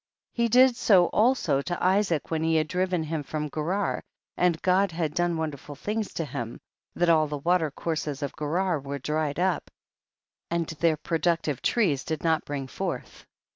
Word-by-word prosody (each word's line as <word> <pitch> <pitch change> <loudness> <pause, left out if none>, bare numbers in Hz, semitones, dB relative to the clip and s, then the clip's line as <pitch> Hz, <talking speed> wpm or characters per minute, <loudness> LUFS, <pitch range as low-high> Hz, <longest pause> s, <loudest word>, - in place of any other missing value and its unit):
34. 235 - +1
He 235 - +2
did 255 +2 +6
so 195 -6 +5
also 225 - +2
to 175 +4 -3
Isaac 185 -5 +1
when 160 -1 0
he 160 0 +2
had 155 -1 +2
driven 180 -1 0
him 155 0 -3
from 150 +1 -4
Gerar, 180 +7 -1 0.3
and 175 -3 +2
God 190 +1 +3
had 160 -2 -2
done 175 0 +1
wonderful 150 -2 -5
things 210 +8 -3
to 165 - -1
him, 120 -5 -5 0.4
that 175 - +2
all 160 -2 +4
the 150 0 -4
water 165 +2 +2
courses 150 -1 -3
of 140 - -3
Gerar 165 +3 0
were 140 +1 -5
dried 150 +1 -2
up, 180 +1 0 0.8
and 170 0 0
their 160 0 +1
pro 165 +2 -2
ductive 165 -6 0
trees 170 - +1
did 160 -2 -4
not 160 -2 +1
bring 140 -2 -4
forth. 130 - -5
165 Hz, 180 wpm, -27 LUFS, 150-180 Hz, 0.8 s, did